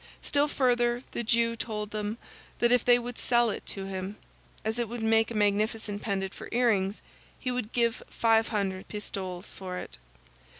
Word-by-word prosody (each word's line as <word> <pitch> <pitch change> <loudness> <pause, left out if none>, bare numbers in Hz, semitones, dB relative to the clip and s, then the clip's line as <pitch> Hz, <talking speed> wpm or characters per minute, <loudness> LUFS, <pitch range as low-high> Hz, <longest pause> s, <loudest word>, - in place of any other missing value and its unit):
Still 290 +1 +3
further, 245 -3 +2
the 235 - -2
Jew 230 0 +3
told 210 -2 -4
them 215 +1 -2 0.4
that 240 0 +3
if 245 -1 +5
they 245 0 +6
would 245 0 -5
sell 240 -2 +3
it - - -5
to 195 -1 -3
him, 190 +1 -4 0.5
as 220 +2 -1
it 235 -3 -1
would 235 -1 -4
make 225 0 +4
a 235 - -5
magnificent 210 0 +1
pendant 195 -2 -2
for - - -9
earrings, 215 -5 +2 0.3
he 255 - -2
would 245 -3 -2
give 235 -1 +1
five 225 -1 +3
hundred 195 -3 -2
pistoles 190 -3 -5
for 185 -1 -6
it. - - -8
225 Hz, 175 wpm, -29 LUFS, 205-240 Hz, 0.5 s, they